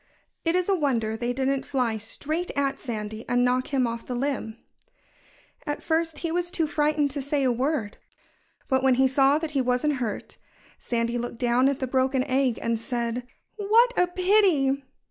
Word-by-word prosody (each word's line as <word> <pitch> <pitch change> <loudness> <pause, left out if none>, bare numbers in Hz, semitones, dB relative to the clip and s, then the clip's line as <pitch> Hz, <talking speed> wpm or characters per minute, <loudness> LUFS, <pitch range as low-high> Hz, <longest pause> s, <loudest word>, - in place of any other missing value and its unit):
It 330 +1 +1
is 365 -1 +1
a 395 - +3
wonder 235 -9 0
they 240 +2 -2
didn't 265 +1 0
fly 245 -5 -1
straight 305 +11 -4
at 275 -1 0
Sandy 220 -3 -5
and 245 0 +3
knock 250 +1 +1
him 270 -3 +1
off 230 0 -4
the 250 - -3
limb. 245 -4 -2 1.1
At 295 - -3
first 325 -1 0
he 330 - -1
was 350 +1 -1
too 330 -2 0
frightened 300 -1 +1
to 280 +1 -3
say 280 +1 0
a 255 - +3
word. 250 -3 -1 0.7
But 265 -1 +2
when 265 -1 +4
he 265 +1 +4
saw 270 +2 +4
that 320 -1 -4
he 280 -3 +1
wasn't 255 +4 +1
hurt, 230 -5 -5 0.4
Sandy 235 0 -1
looked 240 0 -5
down 245 +2 +3
at 280 - -1
the 265 - -2
broken 260 0 +1
egg 260 -3 +1
and 230 -1 0
said: 240 0 -3 0.3
"What 450 +4 +4
a 360 - +3
pity!" 360 -7 +3
265 Hz, 185 wpm, -26 LUFS, 245-300 Hz, 1.1 s, when